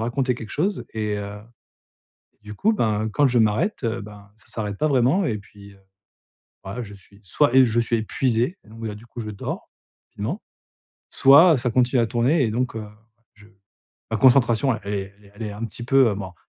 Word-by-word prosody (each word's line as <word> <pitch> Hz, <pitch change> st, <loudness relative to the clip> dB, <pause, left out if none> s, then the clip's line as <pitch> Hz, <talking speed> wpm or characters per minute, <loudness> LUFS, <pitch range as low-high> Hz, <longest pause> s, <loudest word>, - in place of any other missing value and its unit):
raconter 125 Hz, +2 st, 0 dB
quelque 115 Hz, -3 st, -9 dB
chose 185 Hz, +5 st, -1 dB
et 105 Hz, -1 st, -2 dB
heu, 100 Hz, 0 st, -6 dB, 1.1 s
du 105 Hz, 0 st, -9 dB
coup, 220 Hz, -, +2 dB
ben, 110 Hz, -, 0 dB
quand 145 Hz, +6 st, +3 dB
je 120 Hz, -2 st, +2 dB
m'arrête, 115 Hz, -, +1 dB
heu, 115 Hz, 0 st, -2 dB
ben, 100 Hz, -1 st, -13 dB
ça 110 Hz, -, -23 dB
s'arrête 105 Hz, -3 st, -5 dB
pas 155 Hz, -, +1 dB
vraiment 135 Hz, +9 st, +3 dB
et 110 Hz, -8 st, -1 dB
puis, 100 Hz, 0 st, -15 dB
heu, 95 Hz, -, -23 dB, 0.9 s
voilà 105 Hz, +6 st, -5 dB
je 100 Hz, -, -11 dB
suis 100 Hz, +1 st, -19 dB
soit 120 Hz, -, +1 dB
et 130 Hz, -, +8 dB
je 115 Hz, 0 st, +1 dB
suis 115 Hz, 0 st, 0 dB
épuisé, 120 Hz, -, -1 dB
et -, -, -22 dB
donc, 115 Hz, +1 st, -13 dB
bah, 115 Hz, -, -4 dB
là, 105 Hz, -, -5 dB
du 110 Hz, +3 st, -13 dB
coup, 120 Hz, -, -9 dB
je 110 Hz, -, -5 dB
dors, 100 Hz, -, -6 dB, 0.4 s
finalement, 125 Hz, -, -4 dB, 0.7 s
soit 145 Hz, +3 st, +6 dB
ça 125 Hz, 0 st, -1 dB
continue 125 Hz, +1 st, +2 dB
à 115 Hz, -, +1 dB
tourner 130 Hz, +7 st, +1 dB
et 110 Hz, -, 0 dB
donc, 120 Hz, +1 st, -2 dB
heu, 110 Hz, -, -5 dB, 0.5 s
je 105 Hz, 0 st, -19 dB, 0.6 s
la 110 Hz, -, 0 dB
concentration 125 Hz, 0 st, +4 dB
elle 100 Hz, +1 st, -4 dB
est 100 Hz, 0 st, -5 dB
elle 105 Hz, -, -21 dB
est 100 Hz, -, -19 dB
elle 115 Hz, -, -7 dB
est 105 Hz, -, -4 dB
un 105 Hz, +3 st, -7 dB
petit 115 Hz, +2 st, -8 dB
peu, 130 Hz, -1 st, +4 dB
heu, 100 Hz, -, -3 dB
bon, 95 Hz, -2 st, -7 dB
115 Hz, 215 wpm, -23 LUFS, 105-130 Hz, 1.1 s, et